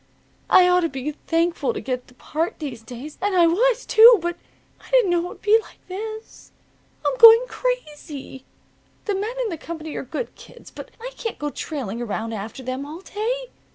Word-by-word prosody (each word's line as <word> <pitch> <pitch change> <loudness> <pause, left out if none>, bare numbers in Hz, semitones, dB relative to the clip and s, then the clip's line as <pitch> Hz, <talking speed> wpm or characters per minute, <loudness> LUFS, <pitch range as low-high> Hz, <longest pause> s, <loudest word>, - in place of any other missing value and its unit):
I 365 -1 +7
ought 360 0 +4
to 335 -2 0
be 270 +1 -4
thankful 335 +8 -1
to - - -3
get 255 -5 -4
the 250 - -20
part 320 +6 -3
these 265 -7 -6
days. 250 +6 -10
And 400 0 0
I 345 -2 +6
was, 470 +8 +2
too. 460 +1 +8
But 345 +1 -3 0.4
I - - -17
didn't - - +4
know 345 0 +1
it - - -4
would - - -11
be 430 +1 +5
like - - -17
this. 435 +4 -8 0.5
I'm - - +1
going 460 +1 +9
crazy. 300 - -5 0.6
The 415 - 0
men 420 +5 -3
in 455 - -2
the 335 -5 -5
company 320 -2 -7
are - - -3
good 455 - -5
kids, - - -15
but - - -10
I - - -7
can't 455 - -4
go 295 0 -3
trailing 240 -9 -5
around 225 0 -3
after 220 +5 -6
them 255 +2 -4
all 310 +5 -8
day. 485 +5 -3
345 Hz, 195 wpm, -23 LUFS, 280-440 Hz, 0.6 s, going